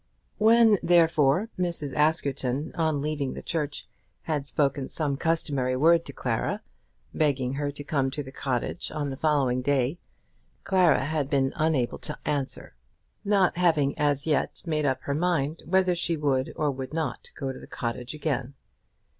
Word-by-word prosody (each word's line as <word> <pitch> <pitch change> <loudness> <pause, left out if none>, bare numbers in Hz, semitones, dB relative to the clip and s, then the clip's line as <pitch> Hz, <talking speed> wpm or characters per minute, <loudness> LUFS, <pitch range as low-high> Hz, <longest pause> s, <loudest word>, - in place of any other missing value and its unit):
When, 220 -1 +6
therefore, 165 +2 +3
Mrs. 170 -6 -1
Askerton 145 -2 0
on 160 -3 0
leaving 150 -3 -2
the - - -7
church 150 -3 -3 0.4
had 150 -3 -2
spoken 140 -1 0
some 145 -3 -1
customary 140 -5 0
word 165 +5 +4
to - - -6
Clara, 125 -4 -2 0.5
begging 135 -4 +1
her 145 +1 -2
to 145 0 -7
come 140 -2 0
to 145 +2 -4
the 130 - -10
cottage 130 -3 -2
on 145 -2 -3
the - - -4
following 135 -4 +1
day, 140 +3 +1 0.6
Clara 180 -8 +3
had 150 -2 -1
been 135 -3 +1
unable 155 -6 0
to 150 - -6
answer, 145 - -3 0.5
not 200 -4 +2
having 155 -6 +2
as 145 -1 +1
yet 155 -2 0
made 155 -3 0
up 130 - 0
her 140 - -2
mind 160 -1 0
whether 185 +1 +3
she 170 -1 0
would 140 -3 0
or 150 -2 +1
would 130 +2 -6
not 155 -7 -3
go 135 -1 -3
to - - -10
the - - -12
cottage 125 +3 -4
again. 140 -3 -2
145 Hz, 160 wpm, -27 LUFS, 135-160 Hz, 0.6 s, When